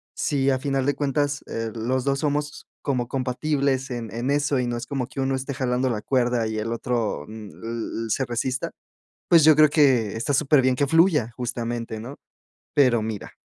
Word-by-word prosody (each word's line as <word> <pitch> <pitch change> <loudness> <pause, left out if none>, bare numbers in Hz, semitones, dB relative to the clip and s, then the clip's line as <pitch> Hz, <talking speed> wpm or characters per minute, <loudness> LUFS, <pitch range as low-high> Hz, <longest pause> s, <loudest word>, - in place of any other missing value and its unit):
si 140 -4 +1
a 130 -1 +1
final 135 -1 -1
de 145 - +1
cuentas, 145 0 -1
eh, 115 -1 -3
los 125 +3 -1
2 135 0 +1
somos 150 0 -2 0.2
como 125 -4 -1
compatibles 135 +1 -1
en 120 -3 -5
en 120 +4 -2
eso, 145 -1 +1
y 125 - 0
no 120 0 -2
es 120 0 -5
como 135 -3 -2
que 135 - -8
uno 135 0 +1
esté 135 +2 -4
jalando 130 -1 0
la 110 -3 -2
cuerda 120 -3 +1
y 110 - -3
el 110 +2 -2
otro, 115 - -2
mm, 110 -2 -9
l 115 0 -5
l - - -7
se 130 +5 0
resista, 125 +2 -2 0.6
pues, 165 -3 +7
yo 155 -1 +8
creo 155 0 +6
que, 130 -9 +3
está 140 +5 -1
superbién 135 -3 +3
que 140 - +1
fluya, 165 - +3
justamente, 115 -2 -3
¿no?, 130 +5 -9 0.6
pero 125 -5 +4
mira 110 -2 -5
130 Hz, 195 wpm, -24 LUFS, 115-140 Hz, 0.6 s, yo